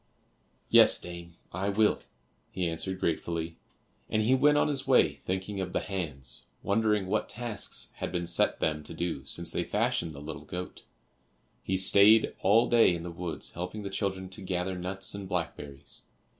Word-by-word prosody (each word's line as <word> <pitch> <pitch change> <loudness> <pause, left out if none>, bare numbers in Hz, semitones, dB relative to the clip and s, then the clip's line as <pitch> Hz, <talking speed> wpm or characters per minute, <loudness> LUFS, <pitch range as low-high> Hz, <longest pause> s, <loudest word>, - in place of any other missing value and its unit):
"Yes, - - +7
dame, 85 -1 -9 0.2
I 95 +3 -1
will," 105 +1 +3 0.5
he 90 -1 -2
answered 95 +3 -3
gratefully, 85 0 -2 0.5
and 110 0 +1
he 120 +4 +3
went 145 +3 +5
on - - +3
his 140 -3 -2
way - - +5
thinking 95 +2 -3
of 90 -1 -4
the - - +2
hands, 75 -10 -5 0.2
wondering 105 -1 +2
what 95 - -1
tasks 115 -2 -3
had - - -4
been 90 -1 -2
set 85 0 +1
them 75 -1 0
to - - -8
do 85 -6 -3
since 85 +3 -2
they 85 - -1
fashioned 105 -6 0
the 70 - -9
little 75 +2 -7
goat. 90 0 -7 0.8
He 95 - -1
stayed 100 +4 +6
all 110 +5 +5
day 115 -7 +5
in 85 - -6
the 85 - -5
woods 85 0 -4
helping 90 +5 -5
the 100 - -5
children 95 -2 -2
to 95 +2 -9
gather 90 0 -2
nuts 95 +2 -4
and 100 -2 -7
blackberries. 70 -5 -5
95 Hz, 170 wpm, -29 LUFS, 85-100 Hz, 0.8 s, Yes